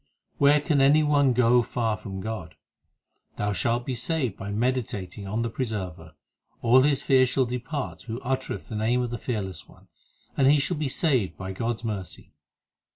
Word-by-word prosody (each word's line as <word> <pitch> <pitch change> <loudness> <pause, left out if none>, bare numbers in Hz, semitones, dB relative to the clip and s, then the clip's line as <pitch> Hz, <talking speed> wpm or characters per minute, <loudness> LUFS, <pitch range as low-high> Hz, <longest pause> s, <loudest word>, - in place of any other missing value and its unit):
7 - - -41
Where 145 +1 +5
can 150 -2 +2
any 145 +3 +5
one 145 -3 +3
go 125 0 +4
far 115 -1 -1
from 95 0 -7
God? 95 -8 -6 0.8
Thou 105 0 -1
shalt 120 +4 0
be 130 - -2
saved 125 - -1
by 95 - -7
meditating 105 -4 -2
on 110 +4 -1
the 115 - -1
Preserver. 95 - -5 0.5
All 125 +2 +6
his 140 0 +2
fear 130 -2 +4
shall 130 +1 +1
depart 125 +4 -4
who 115 +1 -4
uttereth 130 +1 -3
the 110 - -6
name 115 +4 +1
of 120 - -4
the 120 - -4
Fearless 95 -8 -4
One, - - -20 0.5
And 135 - +3
he 145 +2 +6
shall 150 +4 -1
be 150 -2 -1
saved 130 - 0
by 95 0 -5
God 115 +5 -2
s - - -21
mercy. 100 -7 -5
120 Hz, 185 wpm, -26 LUFS, 105-135 Hz, 0.8 s, All